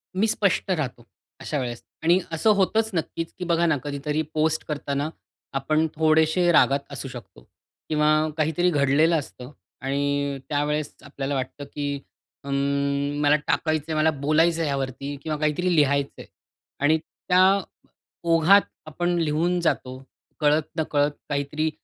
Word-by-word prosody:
मी 215 Hz, +4 st, +2 dB
स्पष्ट 200 Hz, -2 st, +1 dB
राहतो 130 Hz, -8 st, -3 dB, 0.3 s
अशा 150 Hz, -, -3 dB
वेळेस. 120 Hz, -2 st, -5 dB, 0.2 s
आणि 175 Hz, +3 st, +4 dB
असं 165 Hz, +7 st, +1 dB
होतच 220 Hz, +3 st, +2 dB
नक्कीच, 165 Hz, 0 st, -3 dB
की -, -, -3 dB
बघा 170 Hz, 0 st, +2 dB
ना 155 Hz, -3 st, +2 dB
कधीतरी 145 Hz, +2 st, -2 dB
पोस्ट 155 Hz, +1 st, +1 dB
करताना 145 Hz, 0 st, -2 dB, 0.5 s
आपण 155 Hz, +4 st, +1 dB
थोडेशे 160 Hz, +3 st, +3 dB
रागात 140 Hz, -3 st, +4 dB
असू 135 Hz, 0 st, -6 dB
शकतो. 95 Hz, -, -11 dB, 0.5 s
किंवा 150 Hz, -1 st, +2 dB, 0.3 s
काहीतरी 160 Hz, +3 st, +2 dB
घडलेलं 150 Hz, +2 st, +3 dB
असतं. 130 Hz, -1 st, -10 dB, 0.3 s
आणि 140 Hz, +1 st, -1 dB
त्यावेळेस 150 Hz, 0 st, -1 dB
आपल्याला 140 Hz, 0 st, -4 dB
वाटतं, 130 Hz, +2 st, -4 dB
की 145 Hz, -1 st, -4 dB, 0.4 s
अं, 140 Hz, +1 st, -1 dB
मला 145 Hz, 0 st, +5 dB
टाकायचंय 155 Hz, 0 st, 0 dB
मला 155 Hz, +1 st, +3 dB
बोलायचंय 160 Hz, +3 st, +2 dB
ह्यावरती 140 Hz, 0 st, -3 dB
किंवा 155 Hz, -1 st, -2 dB
काहीतरी 165 Hz, +4 st, +1 dB
लिहायचंय. 140 Hz, -2 st, +1 dB, 0.5 s
आणि 155 Hz, +3 st, +3 dB
त्या 180 Hz, +3 st, -1 dB, 0.9 s
ओघात 165 Hz, +5 st, +6 dB, 0.3 s
आपण 175 Hz, +3 st, -2 dB
लिहून 165 Hz, +3 st, +1 dB
जातो 130 Hz, -5 st, -1 dB, 0.4 s
कळत 150 Hz, 0 st, +2 dB
नकळत 145 Hz, -1 st, +1 dB, 0.2 s
काहीतरी 145 Hz, +2 st, -1 dB
150 Hz, 130 wpm, -24 LUFS, 140-160 Hz, 0.9 s, ओघात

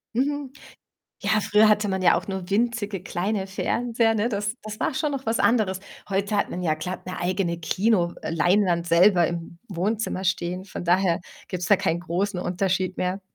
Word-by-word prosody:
Mhm. 280 Hz, +1 st, -1 dB, 0.7 s
Ja, 215 Hz, -, +2 dB
früher 210 Hz, +1 st, +4 dB
hatte 210 Hz, 0 st, +3 dB
man 190 Hz, -1 st, -1 dB
ja 180 Hz, -, +5 dB
auch -, -, -6 dB
nur 190 Hz, -2 st, -4 dB
winzige 215 Hz, -2 st, 0 dB
kleine 190 Hz, +2 st, -2 dB
Fernseher, 230 Hz, +3 st, 0 dB
ne? 220 Hz, +1 st, +1 dB
Das 210 Hz, -1 st, -2 dB
das 215 Hz, 0 st, -7 dB
war -, -, +1 dB
schon 295 Hz, +1 st, -1 dB
noch 270 Hz, -1 st, -4 dB
was 225 Hz, +1 st, 0 dB
anderes. 205 Hz, -3 st, +2 dB, 0.3 s
Heute 200 Hz, +2 st, 0 dB
hat 200 Hz, -, +1 dB
man 180 Hz, -, -4 dB
ja 165 Hz, -3 st, +1 dB
glatt 180 Hz, +4 st, -6 dB
'ne 185 Hz, 0 st, -5 dB
eigene 175 Hz, -1 st, -1 dB
Kino 185 Hz, 0 st, +1 dB
äh, -, -, -4 dB
Leinwand 175 Hz, +1 st, +2 dB
selber 175 Hz, +1 st, +5 dB
im 170 Hz, 0 st, -5 dB
Wohnzimmer 195 Hz, +1 st, -2 dB
stehen, 180 Hz, 0 st, -1 dB
von 190 Hz, -, -7 dB
daher 175 Hz, -1 st, +2 dB, 0.3 s
gibt's 180 Hz, -2 st, -3 dB
da 205 Hz, -, +6 dB
keinen 165 Hz, +1 st, 0 dB
großen 185 Hz, +2 st, -1 dB
Unterschied 185 Hz, 0 st, -1 dB
mehr. 185 Hz, +2 st, -1 dB
190 Hz, 185 wpm, -25 LUFS, 175-215 Hz, 0.7 s, da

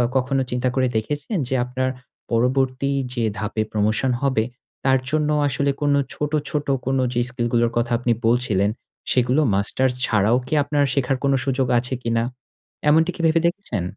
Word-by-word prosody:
কখনো 135 Hz, +1 st, +1 dB
চিন্তা 125 Hz, +1 st, 0 dB
করে 130 Hz, -1 st, +2 dB
দেখেছেন 145 Hz, -, -2 dB
যে 130 Hz, -, -1 dB
আপনার 130 Hz, +1 st, -1 dB, 0.4 s
পরবর্তী 130 Hz, +3 st, +1 dB, 0.2 s
যে 120 Hz, -2 st, -1 dB, 0.2 s
ধাপে 110 Hz, +1 st, -2 dB
প্রমোশন 110 Hz, +5 st, +1 dB
হবে 130 Hz, -5 st, +2 dB, 0.4 s
তার 135 Hz, -1 st, +4 dB
জন্য 150 Hz, 0 st, +1 dB, 0.2 s
আসলে 140 Hz, 0 st, 0 dB
কোন 145 Hz, -1 st, +2 dB, 0.2 s
ছোট, 150 Hz, 0 st, -3 dB, 0.2 s
ছোট 145 Hz, 0 st, -2 dB, 0.2 s
কোনো 135 Hz, 0 st, +1 dB
যে 120 Hz, -, 0 dB
স্কিল 120 Hz, -2 st, -2 dB
গুলোর 120 Hz, -1 st, +3 dB
কথা 120 Hz, +1 st, 0 dB
আপনি 120 Hz, -1 st, 0 dB, 0.2 s
বলছিলেন 110 Hz, -5 st, +2 dB, 0.4 s
সেগুলো 125 Hz, +3 st, +3 dB
মাস্টার্স 125 Hz, +6 st, +1 dB
ছাড়াও 110 Hz, +2 st, +3 dB
কি -, -, -4 dB
আপনার 145 Hz, 0 st, +1 dB
শেখার 135 Hz, -1 st, +1 dB
কোন 140 Hz, 0 st, +3 dB
সুযোগ 135 Hz, -1 st, 0 dB
আছে 125 Hz, +2 st, -4 dB
কিনা? 115 Hz, 0 st, +1 dB, 0.7 s
এমনটি 160 Hz, +3 st, +4 dB
কি -, -, -5 dB
ভেবে 160 Hz, +1 st, +3 dB
দেখেছেন? 170 Hz, -, -3 dB
130 Hz, 165 wpm, -22 LUFS, 120-140 Hz, 0.7 s, তার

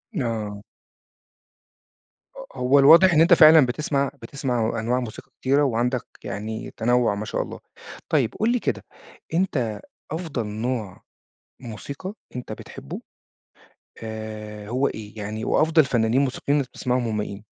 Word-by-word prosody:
آه. 110 Hz, -, -3 dB, 1.7 s
ه -, -, -9 dB
هو 130 Hz, +3 st, +4 dB
الواضح 170 Hz, +6 st, +8 dB
إن 155 Hz, -, +5 dB
أنت 175 Hz, +2 st, +6 dB
فعلًا 155 Hz, -3 st, +8 dB
بتسمع 140 Hz, +1 st, -1 dB
بتسمع 120 Hz, -3 st, -2 dB
أنواع 120 Hz, +3 st, 0 dB
موسيقى 115 Hz, -4 st, -8 dB
كتيرة، 140 Hz, +3 st, +3 dB
وعندك 125 Hz, -1 st, 0 dB, 0.2 s
يعني 110 Hz, +2 st, -5 dB
تنوُّع 120 Hz, -2 st, +2 dB
ما 105 Hz, -, -4 dB
شاء 105 Hz, -, -2 dB
الله. -, -, -7 dB, 0.5 s
طيب 115 Hz, -, +1 dB
قُل 220 Hz, +2 st, +2 dB
لي 245 Hz, -, +1 dB
كده، -, -, -2 dB, 0.5 s
أنت 125 Hz, -, 0 dB, 0.3 s
أفضل 155 Hz, -9 st, -3 dB
نوع 110 Hz, -1 st, -4 dB, 0.6 s
موسيقى 140 Hz, -, -7 dB, 0.2 s
أنت 125 Hz, -, -6 dB
بتحبه 70 Hz, -, -8 dB, 1.0 s
آآ، 110 Hz, -1 st, -7 dB
هو 130 Hz, +4 st, +1 dB
إيه؟ 105 Hz, 0 st, -8 dB
يعني 105 Hz, +1 st, -4 dB
وأفضل 155 Hz, -1 st, +4 dB
فنانين 120 Hz, +1 st, +2 dB
موسيقيين 140 Hz, +2 st, 0 dB
بتسمعهم 125 Hz, -1 st, -2 dB
هم 110 Hz, -1 st, -2 dB
مين؟ 105 Hz, 0 st, -5 dB
125 Hz, 130 wpm, -24 LUFS, 110-140 Hz, 1.7 s, الواضح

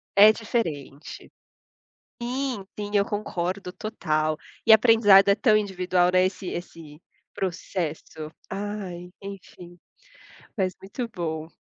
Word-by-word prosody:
É 210 Hz, +2 st, +9 dB
diferente. 165 Hz, -, -4 dB, 0.9 s
Sim, 250 Hz, -3 st, -3 dB
sim, 205 Hz, 0 st, -4 dB
eu 200 Hz, -1 st, +4 dB
concordo 185 Hz, -2 st, -3 dB
total 155 Hz, -8 st, -1 dB, 0.3 s
e -, -, +6 dB
aprendizado 220 Hz, -3 st, +7 dB
é 200 Hz, -, +5 dB
tão 215 Hz, -2 st, +4 dB
individual, 185 Hz, -3 st, +1 dB
né, 185 Hz, 0 st, +5 dB
esse 190 Hz, 0 st, -7 dB
esse 165 Hz, -3 st, -8 dB, 0.3 s
processo 165 Hz, -4 st, -4 dB, 0.2 s
ai, 195 Hz, -3 st, -5 dB
enfim, 180 Hz, -3 st, -11 dB, 0.8 s
mas 190 Hz, -4 st, -1 dB
muito 215 Hz, +5 st, -5 dB
bom. 160 Hz, -6 st, -4 dB
190 Hz, 110 wpm, -25 LUFS, 175-210 Hz, 0.9 s, É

